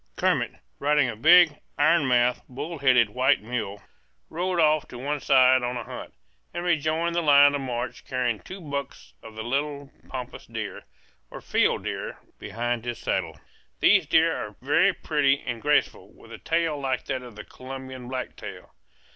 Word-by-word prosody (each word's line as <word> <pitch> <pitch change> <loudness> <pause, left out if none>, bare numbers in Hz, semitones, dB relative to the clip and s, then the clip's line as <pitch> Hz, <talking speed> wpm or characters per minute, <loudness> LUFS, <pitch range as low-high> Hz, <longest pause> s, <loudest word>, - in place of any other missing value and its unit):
Kermit, - - 0 0.3
riding 145 -2 +3
a 115 - -5
big, 160 +4 +6 0.2
iron 155 0 +3
mouthed, 125 0 +2
bull 145 +6 -6
headed 125 -5 +4
white 130 +4 +3
mule, 110 -4 -4 0.5
rode 180 +1 -1
off 155 -2 +3
to 125 - -10
one 145 +4 -3
side 130 -1 +5
on 125 0 -2
a 120 - -5
hunt, - - -9 0.4
and 175 - -3
rejoined 165 0 0
the 170 - +1
line 145 -2 +6
of 145 - -2
march 125 -1 -4
carrying 125 -4 -1
two 190 - -10
bucks 140 - -6
of 110 - -12
the 110 - -5
little 140 +3 -3 0.2
pampas 125 -2 -7
deer, - - -6 0.4
or - - -9
field - - +1
deer, - - -5 0.2
behind 120 +1 -3
his 120 -1 -4
saddle. - - -3 0.4
These - - +4
deer - - +3
are - - -6
very - - +3
pretty 140 0 +1
and 120 -3 -4
graceful, 145 +2 0
with - - -17
a - - -9
tail 165 -3 0
like 130 -2 -2
that 130 -2 -3
of 120 -3 -12
the 105 - -8
Colombian 130 -1 -9
blacktail. 130 0 -7
135 Hz, 170 wpm, -25 LUFS, 125-150 Hz, 0.5 s, big